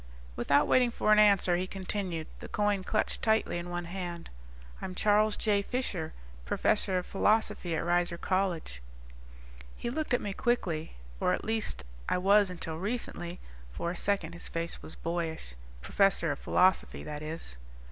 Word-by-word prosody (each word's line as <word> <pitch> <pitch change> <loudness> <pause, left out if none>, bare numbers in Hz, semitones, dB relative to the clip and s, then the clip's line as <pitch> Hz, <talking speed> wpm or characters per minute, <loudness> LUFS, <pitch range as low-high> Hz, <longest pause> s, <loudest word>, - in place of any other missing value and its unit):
Without 140 - +3
waiting 250 -1 +4
for 215 - +1
an 210 - +7
answer, 200 -4 +5
he 185 +1 -2
continued, 185 -4 -3
the - - -8
coin 205 -2 0
clutched 215 +2 -1
tightly 220 -5 +2
in 175 +1 -6
one 175 0 -3
hand. 175 -1 -6 0.5
"I'm 185 - -5
Charles 210 +1 +3
J. 205 -2 +2
Fisher, 200 -8 -2 0.3
professor 185 - +1
of 180 - -2
Philosophy 200 -4 +1
at - - -1
Reiser 175 0 +1
College." 180 - -1 1.0
He 235 - -3
looked 300 -2 0
at - - 0
me 200 - -4
quickly. 175 -10 -1 0.2
"Or 90 - +2
at - - -3
least 220 - 0 0.2
I - - +2
was 200 +2 +5
until 165 -3 -5
recently." 190 -4 -3 0.3
For 170 - -3
a - - -5
second 180 -4 -1
his 175 - -1
face 165 0 -3
was - - -10
boyish. 165 - -3 0.3
"Professor 195 -5 +2
of 140 - -4
Philosophy, 185 +1 +2
that 150 -1 -6
is." 155 - -6
185 Hz, 160 wpm, -30 LUFS, 170-205 Hz, 1.0 s, an